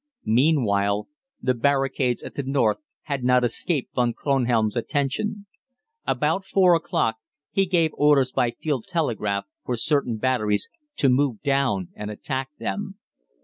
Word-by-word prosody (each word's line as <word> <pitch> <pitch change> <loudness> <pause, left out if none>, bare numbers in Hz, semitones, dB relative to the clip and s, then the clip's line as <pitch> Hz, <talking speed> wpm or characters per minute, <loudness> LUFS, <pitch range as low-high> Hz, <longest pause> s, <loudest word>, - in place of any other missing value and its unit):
Meanwhile 110 -6 +2 0.4
the 130 - +2
barricades 135 0 +1
at - - -8
the - - -3
north 130 -6 +1 0.3
had 140 -4 -3
not 125 0 +4
escaped 130 +4 0
Von 120 -2 +1
Kronhelm's 120 -6 +1
attention. 145 - -2 0.6
About 190 - +1
four 190 -2 +4
o'clock 135 -8 0 0.3
he 195 -1 +2
gave 170 -3 +2
orders 145 -3 +3
by 125 - +1
field 130 +1 -3
telegraph 105 - -1 0.2
for 125 - -2
certain 135 -3 +1
batteries 110 -4 +1 0.3
to 140 - +3
move 130 -3 +1
down 135 - +1
and 105 0 -6
attack 130 +5 -4
them. 200 -1 -4
130 Hz, 135 wpm, -24 LUFS, 115-145 Hz, 0.6 s, not